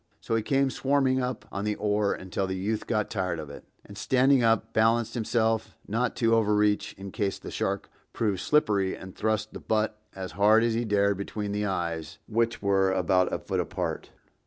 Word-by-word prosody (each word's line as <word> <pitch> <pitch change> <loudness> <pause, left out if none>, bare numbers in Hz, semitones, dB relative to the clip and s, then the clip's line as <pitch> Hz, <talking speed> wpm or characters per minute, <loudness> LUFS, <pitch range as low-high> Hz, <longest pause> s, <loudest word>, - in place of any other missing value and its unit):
So - - -4
he 115 - +2
came 135 +3 +1
swarming 135 -1 +1
up 125 -2 -3
on 100 - -3
the 105 0 0
oar 105 -1 +1
until 95 +1 -3
the 95 - -2
youth 105 +4 -2
got 110 -3 0
tired 90 -4 -1
of 75 -2 -7
it, - - -11 0.2
and 100 - -12
standing 130 +4 +3
up, 115 -1 +2
balanced 115 +1 +2
himself 115 -1 0
not 115 +4 0
to 115 -1 +2
overreach 105 -2 +2
in 95 0 -8
case 100 -2 -1
the - - -9
shark 100 0 -2 0.2
proved 105 -5 -1
slippery 100 -8 +2
and 95 0 -10
thrust 110 0 -1
the - - -7
butt 110 -1 -1
as 95 -1 -5
hard 110 +3 +4
as 115 -1 +2
he 120 +1 0
dared 100 -2 +2
between 100 +1 -4
the 105 0 -1
eyes, 85 -4 -3
which 115 0 0
were 95 -1 +3
about 90 0 +2
a - - 0
foot - - -3
apart. - - -3
105 Hz, 195 wpm, -27 LUFS, 100-115 Hz, 0.2 s, hard